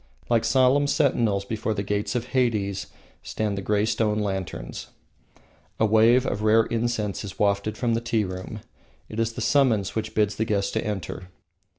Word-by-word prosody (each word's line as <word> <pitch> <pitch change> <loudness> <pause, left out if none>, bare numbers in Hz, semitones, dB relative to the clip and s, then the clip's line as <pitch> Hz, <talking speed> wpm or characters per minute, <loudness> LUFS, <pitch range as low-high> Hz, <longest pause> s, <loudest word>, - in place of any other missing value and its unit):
Like 115 -2 +3
solemn 135 +2 +3
sentinels 115 -10 +1
before 110 +1 -2
the 100 - -2
gates 105 +4 -2
of 125 0 -2
Hades 105 -7 0 0.3
stand 105 -2 -2
the 100 - -4
grey 105 +1 +1
stone 110 -1 0
lanterns. 95 - -4 0.9
A 110 - +4
wave 115 +4 +4
of 105 -5 -2
rare 110 +1 +4
incense 115 -4 -2
is 100 -3 -8
wafted 100 +1 0
from 120 -2 0
the 115 - 0
tea 115 -2 0
room; 95 +3 -6 0.5
it 110 - -5
is 115 0 0
the - - -6
summons 120 -9 +2
which 110 0 -4
bids 105 -1 +1
the 110 - 0
guests 100 -2 0
to - - -1
enter. 95 -3 -5
110 Hz, 175 wpm, -25 LUFS, 100-115 Hz, 0.9 s, A